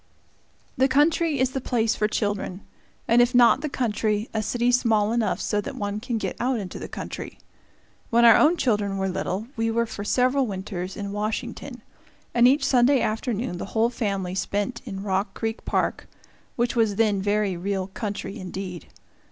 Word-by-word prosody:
The 260 +1 +4
country 300 +3 +2
is 260 0 +1
the 265 - -3
place 230 -3 +1
for 210 - 0
children, 205 -3 -2 0.5
and 235 +1 +5
if 245 +1 +2
not 240 -1 +6
the 305 - -2
country, 215 -4 -1
a 220 - 0
city 240 +3 +1
small 225 -4 +2
enough 235 -2 0
so 210 - 0
that 280 +5 -7
one 205 -3 -3
can 240 +1 -3
get - - -3
out 255 0 +1
into 190 -3 -6
the - - -6
country. - - -7 0.7
When 235 +1 +4
our 230 - +9
own 330 +4 +4
children 205 -7 0
were 190 0 0
little, 190 +2 -2
we 225 0 0
were 235 +1 +1
for 210 -2 -6
several 255 +4 +2
winters 190 -2 -5
in 200 -1 -4
Washington, 210 +1 -4 0.5
and 240 0 +6
each 275 +4 +3
Sunday 260 +1 +4
afternoon 225 -3 -2
the - - -4
whole 230 +2 +3
family 195 -6 -2
spent 205 +5 -2
in 195 -4 -6
Rock 195 0 -1
Creek 225 0 -4
Park, - - -1 0.5
which 240 0 0
was 220 -3 +2
then 210 -2 +2
very 205 -1 +1
real 190 +2 -2
country 200 +1 -5
indeed. 185 -1 -6
220 Hz, 175 wpm, -25 LUFS, 200-245 Hz, 0.7 s, our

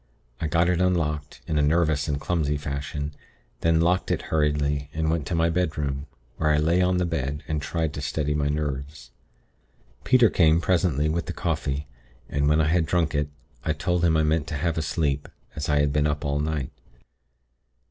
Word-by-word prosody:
I 80 - -1
got 85 +2 +2
it 90 0 +2
unlocked, 75 -5 0
in 75 - 0
a - - +4
nervous 75 -1 +2
and 70 -2 -1
clumsy 75 -2 0
fashion, 70 +1 -4 0.5
then 80 -1 +3
locked 90 +2 +2
it - - +1
hurriedly, 75 -2 +1
and 80 0 +1
went 80 -4 -1
to 90 - -1
my 85 0 +2
bedroom, 75 -5 -1 0.3
where 75 - +1
I 75 - +4
lay 85 +4 +3
on 90 0 +2
the 90 - +1
bed, 75 -3 -2
and 75 -2 -1
tried 80 +1 -2
to 70 - -5
steady 75 0 -1
my 75 -1 0
nerves. 75 -2 -4 0.9
Peter 125 -4 +5
came, 80 -2 +4
presently, 85 -4 +1
with 80 +1 -1
the - - -3
coffee, 70 +2 -2 0.4
and 70 0 +1
when 75 +1 +3
I 80 -1 +3
had 85 -1 +2
drunk 80 -2 +1
it, 75 0 0 0.3
I 80 - +1
told 85 +3 -1
him 80 -2 +4
I 80 - +3
meant 80 0 +1
to 75 - -3
have 85 +2 0
a - - 0
sleep, 75 -1 -1 0.3
as 75 - -3
I 75 -1 +3
had 75 -1 +1
been 75 0 +2
up 75 -1 -2
all 70 0 0
night. 75 -3 -2
75 Hz, 200 wpm, -25 LUFS, 75-85 Hz, 0.9 s, Peter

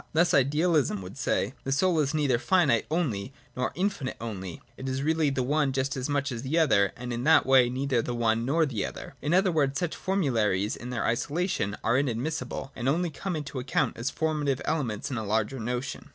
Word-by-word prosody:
Thus 170 +2 +3
ideal 150 +6 +3
ism 105 -9 +1
would 90 - -9
say: - - 0
— - - -32
The 135 - -3
soul 170 +4 +2
is 150 +1 +1
neither 140 -6 +2
finite 140 - +3
only, 140 - -1 0.2
nor 125 -1 -1
infinite 180 -8 -2
only; 95 -7 -6 0.2
it 130 0 -5
is 130 +1 -2
really 160 0 +2
the 135 -2 -1
one 145 +1 +1
just 135 0 -1
as 130 +2 -3
much 140 -1 0
as 115 -2 -4
the 135 +6 -1
other, 100 - +4
and 120 0 -5
in 120 +1 -3
that 160 -1 +6
way 130 -2 +5
neither 130 -1 0
the 120 +1 -4
one 115 -1 +1
nor 160 +6 +2
the 120 -9 -2
other. - - -6
In 150 - -1
other 185 +1 +4
words, 140 -4 +1
such 170 +1 -2
formularies 115 - 0
in 120 - -8
their 125 -2 -2
isolation 140 - -1
are 120 +3 +3
inadmissible, 135 +1 -3
and 125 +1 -1
only 170 +3 +1
come 180 +5 -4
into 145 -3 -4
account 125 +2 0
as 120 +4 -2
formative 150 -4 -1
elements 130 -5 -2
in 130 - -2
a - - -4
larger 110 +5 -1
notion. 125 +3 -4
135 Hz, 215 wpm, -27 LUFS, 120-155 Hz, 0.2 s, that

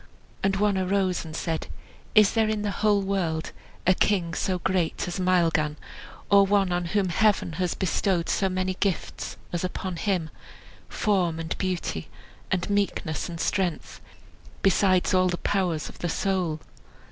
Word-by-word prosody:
And 195 0 +2
one 200 -1 +2
arose 185 -1 +1
and 155 -1 -8
said, 165 -1 -2 0.5
"Is 210 -2 +6
there 225 -1 +2
in 215 -1 -1
the 205 - -1
whole 205 +1 +2
world 175 -5 -1 0.3
a 185 - +6
king 180 -3 +1
so 185 +2 0
great 180 -2 -1
as 175 +2 -4
Maelgan, 165 -5 +2 0.5
or 200 0 +8
one 195 -1 +2
on 175 0 0
whom 195 +1 0
Heaven 205 -2 +2
has 180 -2 0
bestowed 185 -1 0
so 195 - +1
many 185 0 -1
gifts 195 -4 -2 0.2
as 175 - -1
upon 185 -1 -3
him; 180 -5 -1 0.6
form, 180 -6 +1
and 165 0 -3
beauty, 180 - -2 0.4
and 180 -1 0
meekness, 200 -6 -1
and 170 -1 -6
strength, 180 -3 -1 0.6
besides 190 0 +3
all 185 0 +4
the 180 - -1
powers 175 -8 0
of - - -12
the 175 - -2
soul?" 180 -4 -1
185 Hz, 155 wpm, -26 LUFS, 170-195 Hz, 0.6 s, or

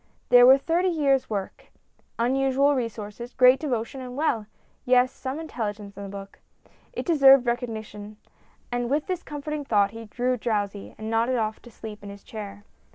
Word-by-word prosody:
There 245 0 +8
was 265 +1 +7
thirty 345 +3 +1
years' 285 -6 +1
work, 200 -3 -5 0.5
unusual 270 +3 +2
resources, 230 -1 -5
great 255 +1 +6
devotion, 260 -2 -3
and 250 0 -8
well, 235 -9 0 0.4
yes 250 +1 +3
some 265 +3 -5
intelligence 210 -9 -5
in - - -9
the 200 - -7
book. 195 0 -10 0.5
It - - -5
deserved 275 -6 +6
recognition, 220 -3 -4 0.5
and 245 0 -2
with 290 +2 0
this 365 -2 -3
comforting 295 -1 -5
thought 205 -6 +2
he 225 0 -9
grew 250 +3 -1
drowsy, 205 -3 -3
and 220 +1 -5
nodded 230 +3 +1
off 220 -1 -2
to 240 - -14
sleep 215 -2 -10
in 200 - -9
his 200 0 -11
chair. 205 -2 -8
240 Hz, 165 wpm, -25 LUFS, 215-270 Hz, 0.5 s, There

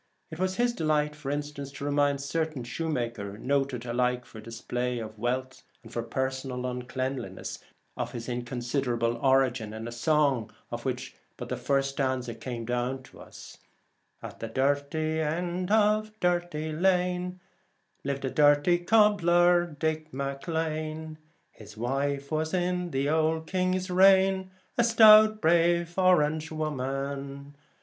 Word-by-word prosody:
It 160 - -8
was 185 0 0
his 240 +2 +1
delight, 150 -4 0
for 150 -2 -6
instance, 145 -1 -4
to 140 +1 -6
remind 145 -1 +2
a - - -8
certain 155 -2 -2
shoemaker, 120 -7 -3
noted 135 -1 -1
alike 125 +1 0
for 110 - -11
display 120 +2 -3
of 110 -2 -7
wealth 130 +3 -2 0.2
and 115 0 -13
for 120 - -1
personal 130 +1 -3
uncleanness, 125 -4 -4 0.4
of - - -4
his 115 -1 -6
inconsiderable 120 -1 -1
origin 125 -4 +2
in 110 +1 -6
a - - -6
song 135 -2 +1 0.2
of - - -5
which - - -3 0.2
but - - -7
the - - -1
first 135 -1 0
stanza 130 -3 -1
has 115 - -16
come 120 -2 -5
down 125 +2 -2
to - - -16
us: - - -12 0.6
At - - -8
the 115 - -4
dirty 145 +5 0
end 175 +4 -2
of 215 0 +2
Dirty 175 -3 0
Lane, 180 +1 0 0.6
Liv'd 140 0 -3
a 130 - -2
dirty 145 +4 +4
cobbler, 175 -3 +4
Dick 155 0 -3
Maclane; 155 +3 -3 0.3
His 105 -1 -14
wife 140 +4 -2
was 155 +3 -1
in 180 0 -1
the 135 -2 -1
old 160 +1 +1
king's 185 +1 -1
reign 190 0 +5 0.3
A - - +6
stout 215 -2 +7
brave 170 +1 +3
orange 155 -4 +3
woman. 140 -1 -4
145 Hz, 140 wpm, -28 LUFS, 130-170 Hz, 0.6 s, stout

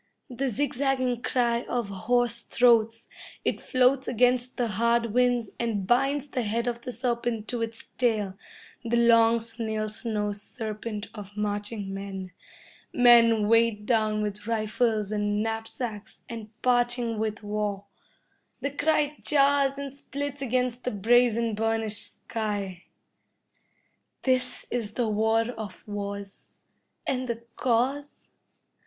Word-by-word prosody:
The 265 +2 -1
zigzagging 255 -1 0
cry 235 -2 +1
of 240 -4 -1
hoarse 235 +4 +1
throats, 230 -2 +3 0.4
it - - 0
floats 255 +1 +2
against 250 +1 +2
the 245 - +1
hard 230 +1 +1
winds, 245 -3 +2
and 220 -5 -1
binds 275 +6 +2
the 255 - -1
head 230 +2 -1
of 240 -1 -2
the 250 - -5
serpent 235 -3 -2
to 240 -2 -2
its 225 -1 -4
tail, 215 -6 0 0.5
the 235 0 +1
long 230 -1 +5
snail 220 -1 -3
slow 210 -1 -2
serpent 215 +1 -6
of 205 -1 -10
marching 205 -1 -3
men. 195 -1 -6 0.6
Men 230 -3 +6
weighed 230 -2 +3
down 215 -2 +2
with 210 0 -5
rifles 215 -1 0
and 205 0 0
knapsacks, 225 -1 -5
and 225 -2 -7
parching 245 -2 +2
with 220 -1 -2
war. 205 -1 -2 0.8
The 280 - -1
cry 295 0 +1
jars 280 -1 +3
and 280 -1 -5
splits 285 0 -5
against 250 -1 0
the - - 0
brazen, 230 +1 +3
burnished 220 -1 -1
sky. 205 -5 -3 1.4
This 255 -1 +1
is 220 -4 -2
the 240 -2 +1
war 220 +2 +2
of 215 -5 -9
wars, 200 -1 -6 0.6
and 255 -1 -1
the 235 -1 -4
cause? 265 +4 -1
230 Hz, 125 wpm, -27 LUFS, 215-245 Hz, 1.4 s, Men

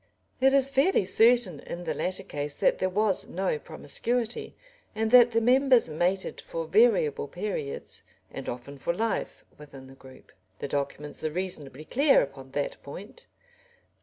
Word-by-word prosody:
] - - -40
It 270 +1 +5
is 275 0 +3
fairly 275 - +3
certain 220 - +3
in 175 - -7
the 160 -2 -2
latter 185 +6 -3
case 145 -4 -4
that - - +1
there 185 - +1
was 205 +1 +1
no 185 -4 -2
"promiscuity," 235 - -3 0.4
and 220 0 -1
that 245 -1 +8
the 230 -1 +1
members 255 - +4
mated 180 +5 -1
for 165 -1 -5
variable 190 - +3
periods, 175 -5 -5 0.3
and - - -6
often 130 +3 -8
for 170 - -1
life, 225 +1 -3
within 140 -3 -12
the 135 - -14
group. 130 -1 -16 0.3
The - - -5
documents 145 +2 -4
are 155 - 0
reasonably 155 -5 -5
clear 275 - +4
upon 135 -1 -9
that 145 0 -3
point. 205 - -11
185 Hz, 160 wpm, -27 LUFS, 145-230 Hz, 0.4 s, that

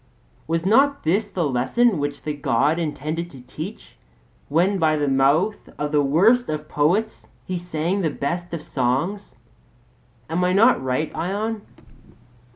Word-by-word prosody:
Was 165 +1 -1
not 275 +7 +3
this 200 +6 +1
the 185 -3 -2
lesson 160 - +2
which 145 0 -3
the 150 - -2
God 145 +2 +1
intended 160 +1 -3
to 135 -6 -13
teach 125 - -9 0.5
when 180 +6 +2
by 155 -2 +3
the 145 -1 0
mouth 140 +10 +2
of 150 0 -2
the 150 -1 +3
worst 195 - +3
of 155 0 -3
poets 175 +11 0 0.2
he 185 - -3
sang 175 +3 -2
the 165 - +1
best 170 +5 -3
of 165 -3 -5
songs? 135 +9 -2 0.9
Am 170 +3 -1
I 180 0 +2
not 225 - +5
right, 130 +4 -2
Ion? 210 +5 -2
165 Hz, 150 wpm, -22 LUFS, 145-195 Hz, 0.9 s, not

